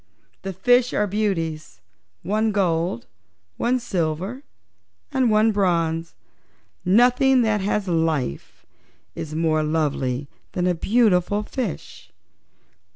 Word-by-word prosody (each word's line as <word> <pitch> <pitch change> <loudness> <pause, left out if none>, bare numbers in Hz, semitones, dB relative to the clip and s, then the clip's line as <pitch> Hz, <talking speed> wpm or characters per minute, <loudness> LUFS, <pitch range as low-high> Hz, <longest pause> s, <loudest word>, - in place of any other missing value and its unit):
"The 195 - -4
fishes 245 +6 +2
are 210 - +2
beauties 165 - -2 0.4
one 215 +2 +1
gold, 170 - 0 0.5
one 245 +2 +1
silver 185 - -3 0.7
and 260 -4 +2
one 215 +1 +4
bronze. 170 -5 0 0.7
Nothing 250 +6 +4
that 215 -2 +1
has 205 0 -1
life 160 - -2 0.5
is 155 0 -6
more 160 -1 +1
lovely 145 -4 -1 0.3
than 180 - -1
a 180 - +2
beautiful 205 +1 +2
fish." 220 -5 -6
190 Hz, 100 wpm, -23 LUFS, 160-220 Hz, 0.7 s, one